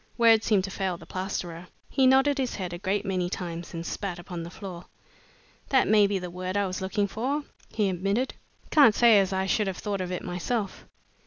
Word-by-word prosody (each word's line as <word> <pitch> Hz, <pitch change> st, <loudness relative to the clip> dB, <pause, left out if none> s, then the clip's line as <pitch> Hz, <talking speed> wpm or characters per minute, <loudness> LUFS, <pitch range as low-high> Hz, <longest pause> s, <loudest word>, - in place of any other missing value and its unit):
Words 225 Hz, -2 st, +5 dB
seemed 205 Hz, -4 st, +3 dB
to 195 Hz, -, -4 dB
fail 190 Hz, -3 st, -2 dB
the -, -, -13 dB
plasterer. 180 Hz, -2 st, -5 dB, 0.2 s
He 265 Hz, -1 st, +3 dB
nodded 270 Hz, +2 st, +4 dB
his 255 Hz, -2 st, -1 dB
head 180 Hz, -3 st, -4 dB
a 175 Hz, -, -5 dB
great 200 Hz, +2 st, -1 dB
many 185 Hz, -2 st, -1 dB
times 170 Hz, -2 st, -5 dB
and 165 Hz, 0 st, -5 dB
spat 195 Hz, -2 st, -4 dB
upon 175 Hz, 0 st, -7 dB
the 165 Hz, -, -6 dB
floor. 180 Hz, -2 st, -8 dB, 0.8 s
"That 265 Hz, -2 st, +4 dB
may 210 Hz, -1 st, +5 dB
be 200 Hz, -1 st, 0 dB
the 180 Hz, -2 st, -6 dB
word 185 Hz, +2 st, -3 dB
I 200 Hz, -, +2 dB
was 190 Hz, +1 st, -4 dB
looking 195 Hz, +2 st, 0 dB
for," 265 Hz, +9 st, -2 dB, 0.3 s
he 210 Hz, -2 st, 0 dB
admitted. 195 Hz, +7 st, -1 dB, 0.4 s
"Can't 275 Hz, -9 st, +6 dB
say 230 Hz, -3 st, +6 dB
as 195 Hz, -1 st, +1 dB
I 190 Hz, 0 st, 0 dB
should 205 Hz, +2 st, +1 dB
have 190 Hz, -2 st, -3 dB
thought 200 Hz, -2 st, -3 dB
of 180 Hz, -1 st, -4 dB
it 180 Hz, -, -3 dB
myself. 195 Hz, +4 st, -3 dB
195 Hz, 215 wpm, -27 LUFS, 180-215 Hz, 0.8 s, Can't